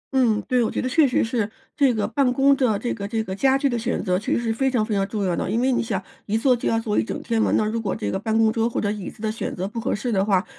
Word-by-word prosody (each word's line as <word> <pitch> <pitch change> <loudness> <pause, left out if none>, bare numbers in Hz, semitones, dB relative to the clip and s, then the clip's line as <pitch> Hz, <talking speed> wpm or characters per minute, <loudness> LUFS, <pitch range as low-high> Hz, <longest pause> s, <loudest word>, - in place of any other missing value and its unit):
嗯， 235 -5 +3
对， 250 -1 +1
我 225 - 0
觉 - - -3
得 - - -1
确 290 +3 +4
实 250 - +1
是 225 -3 -1 0.3
这 280 -4 +4
个 215 -3 -1
办 275 -3 +1
公 275 +2 +4
的 250 -6 +1
这 240 +4 -2
个 200 -2 -5
这 220 +1 -1
个 190 - -5
家 265 +6 +3
具 280 - +1
地 240 -3 -1
选 235 +2 -2
择 180 -1 +1
其 210 - -4
实 - - +2
是 230 -2 -1
非 265 +4 +1
常 240 -5 +1
非 215 - -3
常 195 -1 +1
重 210 -2 -2
要 180 -2 0
的， - - -2
因 230 - 0
为 260 +2 +2
你 245 - +1
想， 200 -5 -2 0.3
一 215 - +1
坐 250 +2 +3
就 240 - -2
要 225 - +2
坐 220 -2 0
一 - - +1
整 - - -5
天 230 -1 0
嘛， - - +2
那 215 - +1
如 225 +2 -2
果 200 -4 -2
这 100 - -3
个 - - -2
办 220 +2 0
公 225 -1 +4
桌 230 0 +1
或 - - -2
者 205 - 0
椅 205 -3 -5
子 215 - -14
地 215 - 0
选 220 - -4
择 185 +2 -3
不 230 +3 -5
合 - - -1
适 240 +4 -3
的 195 -3 +2
话， 195 -2 +2
225 Hz, 370 characters per minute, -23 LUFS, 210-250 Hz, 0.3 s, 确